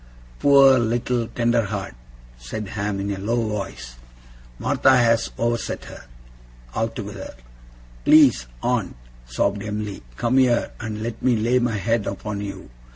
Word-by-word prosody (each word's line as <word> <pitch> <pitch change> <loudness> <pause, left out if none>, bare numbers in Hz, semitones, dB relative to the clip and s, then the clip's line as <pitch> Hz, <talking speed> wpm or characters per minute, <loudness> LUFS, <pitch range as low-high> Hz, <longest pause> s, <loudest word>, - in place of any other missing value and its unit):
'Poor 135 -2 +6
little 120 0 0
tender 120 0 +1
heart,' 100 - -4 0.4
said - - -7
Ham, 100 -1 -3
in 100 +1 -2
a 100 - -4
low 110 +5 -1
voice. 95 - -5 0.6
'Martha 130 - +3
has 115 -1 +3
overset 115 0 -2
her, - - -11 0.7
altogether.' 110 - -4 0.7
'Please, 130 - +5 0.2
aunt,' - - 0 0.3
sobbed 100 +12 -1
Em'ly, 105 -1 -4 0.2
'come 125 +3 +2
here, 125 -2 +2
and 110 -1 -5
let 115 -1 -5
me 130 -2 +3
lay 120 +3 +2
my 120 -3 0
head 115 +1 0
upon 100 +1 -4
you. 100 -10 -7
110 Hz, 135 wpm, -22 LUFS, 100-120 Hz, 0.7 s, Poor